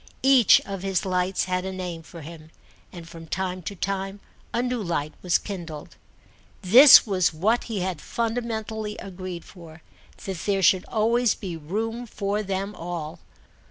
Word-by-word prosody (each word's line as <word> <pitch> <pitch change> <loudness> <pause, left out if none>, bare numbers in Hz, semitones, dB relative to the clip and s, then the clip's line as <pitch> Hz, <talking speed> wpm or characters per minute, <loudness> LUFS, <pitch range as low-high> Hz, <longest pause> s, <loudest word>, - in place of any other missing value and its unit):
Each 265 -5 +6
of 195 -2 -6
his 195 -1 -1
lights 185 0 0
had 180 0 -1
a 190 - -4
name 180 -3 -5
for 165 0 -12
him, 155 0 -11 0.4
and 170 -2 -10
from 165 -1 -11
time 185 +1 -3
to 200 +4 -6
time 195 +1 -3 0.3
a 240 - 0
new 250 -2 -2
light 155 -5 -2
was 180 -2 +2
kindled. 170 -7 -8 0.7
This 250 +10 +9
was 190 -5 +1
what 210 +10 0
he 215 -5 -3
had 180 -4 -3
fundamentally 220 -2 -3
agreed 185 -2 -7
for, 170 -3 -14 0.4
that 190 -2 -4
there 195 -1 +1
should 185 0 +4
always 230 +1 +1
be 185 -5 -6
room 225 +9 -4
for 205 0 -2
them 195 0 -3
all. 165 -4 -6
190 Hz, 160 wpm, -25 LUFS, 175-215 Hz, 0.7 s, This